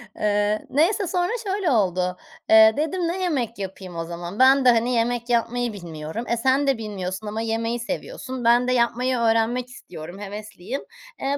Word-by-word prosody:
Eee, 210 Hz, 0 st, 0 dB
neyse, 355 Hz, +8 st, +2 dB
sonra 355 Hz, +1 st, 0 dB, 0.2 s
şöyle 390 Hz, -5 st, 0 dB
oldu. 180 Hz, -4 st, +1 dB, 0.3 s
Eee, 220 Hz, 0 st, +8 dB
dedim 335 Hz, +3 st, -1 dB
ne 365 Hz, +3 st, -2 dB
yemek 245 Hz, -, -1 dB
yapayım 190 Hz, -2 st, -7 dB
o 165 Hz, -, -3 dB
zaman? 175 Hz, +4 st, -7 dB
Ben 265 Hz, 0 st, +6 dB
de, -, -, +8 dB
hani, 235 Hz, +2 st, +1 dB
yemek 235 Hz, +1 st, 0 dB
yapmayı 240 Hz, 0 st, 0 dB
bilmiyorum. 170 Hz, +3 st, -6 dB
E, 235 Hz, -, 0 dB
sen 265 Hz, +4 st, +2 dB
de 270 Hz, -4 st, +2 dB
bilmiyorsun 205 Hz, -1 st, -5 dB
ama 215 Hz, +2 st, -3 dB
yemeyi 230 Hz, +1 st, -1 dB
seviyorsun. 250 Hz, +2 st, -5 dB
Ben 240 Hz, +2 st, +4 dB
de -, -, +2 dB
yapmayı 250 Hz, +1 st, +1 dB
öğrenmek 230 Hz, +2 st, +1 dB
istiyorum, 175 Hz, -7 st, -10 dB
hevesliyim. 210 Hz, +4 st, -6 dB, 0.4 s
Eee, 280 Hz, +1 st, 0 dB
230 Hz, 170 wpm, -23 LUFS, 205-255 Hz, 0.4 s, Eee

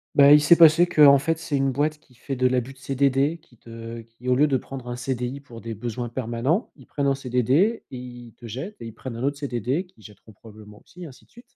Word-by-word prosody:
Bah 140 Hz, 0 st, +7 dB
il 150 Hz, -, +7 dB
s'est 160 Hz, +3 st, +6 dB
passé 170 Hz, +1 st, +6 dB
qu'en 145 Hz, -5 st, +6 dB
fait 165 Hz, +4 st, -1 dB
c'est 160 Hz, -2 st, -4 dB
une 135 Hz, -1 st, +1 dB
boîte 150 Hz, +3 st, -1 dB
qui 130 Hz, -4 st, -26 dB
fait 135 Hz, +3 st, -6 dB
de 130 Hz, 0 st, +2 dB
l'abus 125 Hz, +1 st, -1 dB
de 135 Hz, -, -22 dB
CDD, 135 Hz, +3 st, 0 dB
qui 145 Hz, -7 st, -26 dB
te 115 Hz, 0 st, -9 dB
qui 115 Hz, +2 st, -14 dB
au 125 Hz, -, +3 dB
lieu 145 Hz, +4 st, +4 dB
de 135 Hz, -3 st, +1 dB
prendre 130 Hz, -1 st, -9 dB
un 120 Hz, -, -4 dB
CDI 125 Hz, +1 st, -4 dB
pour 120 Hz, -5 st, -13 dB
des 115 Hz, -1 st, -6 dB
besoins 120 Hz, +2 st, -5 dB
permanents, 125 Hz, -, -2 dB
ils 130 Hz, -, -17 dB
prennent 140 Hz, -, -3 dB
un 140 Hz, -, +3 dB
CDD 135 Hz, -, +1 dB
et -, -, -7 dB
ils 120 Hz, -2 st, -11 dB
te 120 Hz, -, -12 dB
jettent 135 Hz, -, -7 dB
et 115 Hz, -, -7 dB
ils 115 Hz, -, -10 dB
prennent 120 Hz, +1 st, -8 dB
un 115 Hz, -, -7 dB
autre 140 Hz, +1 st, -1 dB
CDD 135 Hz, -, -2 dB
qu'ils 175 Hz, -12 st, -24 dB
jetteront 105 Hz, +2 st, -16 dB
probablement 105 Hz, 0 st, -15 dB
aussi 180 Hz, -, -13 dB
et -, -, -6 dB
ainsi 135 Hz, -5 st, -14 dB
de -, -, -37 dB
suite. 240 Hz, -, -16 dB
130 Hz, 260 wpm, -24 LUFS, 120-145 Hz, -, Bah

